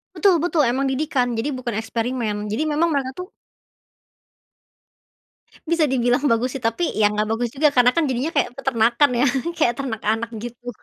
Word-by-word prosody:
Betul 395 -3 +4
betul. 335 -4 +2
Emang 270 +2 0
didikan. 265 -3 0
Jadi, 235 +6 -1
bukan 250 -4 -4
eksperimen. 225 0 -2 0.2
Jadi, 240 +9 -1
memang 320 +3 +2
mereka, 265 -2 -1
tuh 365 - -5 2.4
bisa 320 -4 +2
dibilang 245 0 +1
bagus, 230 +3 +1
sih, 270 - -5
tapi, 230 +9 -1
ya, 210 -1 +3
nggak 210 0 -1
bagus 235 +1 -1
juga, 285 +3 +2
karena, 245 -1 +5
kan, 325 +3 +1
jadinya 260 +3 -1
kayak 245 - +1
peternakan, 245 +1 +2
ya 255 - +3 0.3
kayak 240 -6 +2
ternak 235 -4 -5
anak, 225 +2 0
gitu. 240 +2 -8
250 Hz, 165 wpm, -21 LUFS, 230-280 Hz, 2.4 s, karena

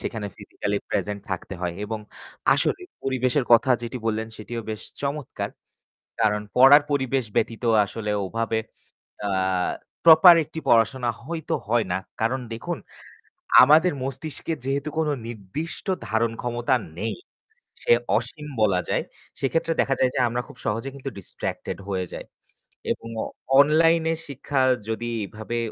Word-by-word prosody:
সেখানে 110 -3 -4
physically - - -3
present 105 -1 -1
থাকতে 95 +1 -4
হয় 90 -1 -2
এবং 110 +1 -4 0.6
আসলেই, 365 -1 0 0.2
পরিবেশের 130 0 +1
কথা 115 +3 +6
যেটি 120 +2 -4
বললেন, 110 0 0
সেটিও 115 +2 -5
বেশ 110 - -5 0.2
চমৎকার। 140 -1 -3 0.7
কারণ 105 -1 +2
পড়ার 135 +4 +9
পরিবেশ 135 -2 +1
ব্যতীত 115 +1 0 0.2
আসলে 105 +1 -5 0.2
ওভাবে 115 +2 -1 0.7
আ - - 0 0.8
প্রপার 170 +2 +10
একটি 160 +2 -9
পড়াশোনা 120 +2 +3 0.2
হইতো 165 +1 -3
হয় 115 0 +2
না। 90 - +1 0.2
কারণ 120 +4 +1
দেখুন, 115 - -4 0.9
আমাদের 155 +6 +5
মস্তিষ্কে 135 +5 -4
যেহেতু 140 +2 -1
কোনো 155 -2 +1 0.2
নির্দিষ্ট 115 - -6 0.2
ধারণ 110 +1 +1
ক্ষমতা 120 +2 0 0.2
নেই, 110 +3 -2 0.7
সে - - +3 0.3
অসীম 125 +6 -7 0.2
বলা 95 -4 +3
যায়। - - +1 0.4
সেক্ষেত্রে 165 +4 0
দেখা 135 - +2
যায় 130 - +3
যে - - -1
আমরা 120 +1 -2
খুব - - -13
সহজে 115 +5 -1
কিন্তু 135 0 -6
ডিস্ট্রাক্টেড 95 - -5
হয়ে 95 -2 -1
যাই - - -6 0.7
এবং - - -4 0.2
অ - - -4 0.3
অনলাইনে 160 +2 +4
শিক্ষা 140 0 -1 0.3
যদি 115 +1 -2 0.2
এভাবে 110 +4 -5
120 Hz, 135 wpm, -24 LUFS, 110-145 Hz, 0.9 s, প্রপার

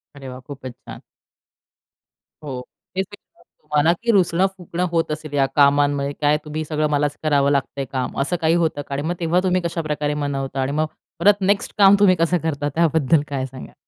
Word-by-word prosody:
अरे 135 -2 -10
वाह! 125 0 -8
खूपच 130 -3 -8
छान. - - -12 1.4
हो, 135 -4 -5 0.4
हेच 190 - +1
मी - - -8
विचारात - - -29
होतो - - -47
तुम्हाला 150 +2 +3
की 235 - +3
रुसणं-फुगणं 180 -1 +1
होत 165 -2 0
असेल 150 -1 -6
या 135 -1 +3
कामांमुळे. 145 0 +3
काय 150 +1 +3
तुम्ही 155 +1 -4
सगळं 155 0 0
मलाच 145 0 0
करावं 140 -2 +3
लागतंय 140 -1 -1
काम 130 -1 -3
असं 175 +6 0
काही 160 +1 +3
होतं 155 -3 -1
का? 140 - -8
आणि 140 - -2
मग 175 - -1
तेव्हा 170 +1 +2
तुम्ही 185 -1 +1
कशाप्रकारे 150 -3 -2
मनवता 135 -1 -3
आणि 130 +2 -1
मग 155 - +2 0.3
परत 205 0 +4
नेक्स्ट 200 +1 +1
काम 200 -1 +7
तुम्ही 190 -3 +5
कसं 170 +1 +1
करता 145 -2 -1
त्याबद्दल 160 -2 +3
काय 135 -2 -2
सांगाल? 130 0 -10
150 Hz, 190 wpm, -21 LUFS, 140-170 Hz, 1.4 s, काम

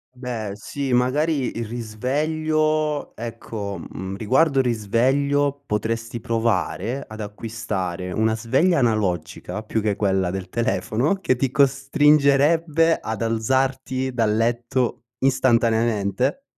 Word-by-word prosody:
Beh, 120 -5 -4
sì, 130 +5 -4
magari 135 +2 +1
il 115 - -2
risveglio, 150 +7 -1
ecco, 110 -4 -6
mhmm, 95 +3 -6
riguardo 135 +7 +2
il 130 - +2
risveglio 135 +6 +1
potresti 115 +2 -2
provare 115 +1 -1
ad 110 0 -10
acquistare 105 -4 -4
una 110 +3 +1
sveglia 130 +11 +2
analogica, 105 - -1
più 110 0 -1
che 105 -1 0
quella 95 -3 +1
del 95 0 -5
telefono, 120 - 0
che 190 -9 0
ti 130 +1 0
costringerebbe 145 +3 +3
ad 110 0 -3
alzarti 130 +3 0
dal 110 -3 +1
letto 120 +1 0
istantaneamente. 120 - +1
120 Hz, 110 wpm, -23 LUFS, 110-140 Hz, -, costringerebbe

